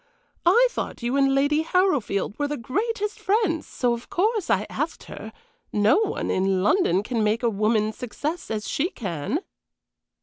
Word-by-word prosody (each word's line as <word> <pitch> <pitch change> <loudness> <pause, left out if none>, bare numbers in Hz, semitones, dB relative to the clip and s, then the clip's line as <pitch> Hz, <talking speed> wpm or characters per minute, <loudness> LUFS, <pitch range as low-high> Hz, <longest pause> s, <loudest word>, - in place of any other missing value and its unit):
I 475 +8 +6
thought 255 - -5
you 240 +3 0
and 275 -1 +3
Lady 285 +3 +3
Harrowfield 300 - 0
were 290 - +1
the 295 0 -3
greatest 420 - -2
friends, 390 -6 +1
so 245 -2 0
of 235 0 -7
course 425 +1 0
I - - +2
asked - - -3
her. - - -9 0.4
No 210 - +4
one 440 - -1
in 190 0 +1
London 205 - +3
can 230 0 -1
make 215 +3 +1
a 235 - +3
woman's 215 +1 +1
success 290 +8 -4
as 215 -1 -3
she 325 +6 0
can." 195 - -3
270 Hz, 165 wpm, -24 LUFS, 215-360 Hz, 0.4 s, I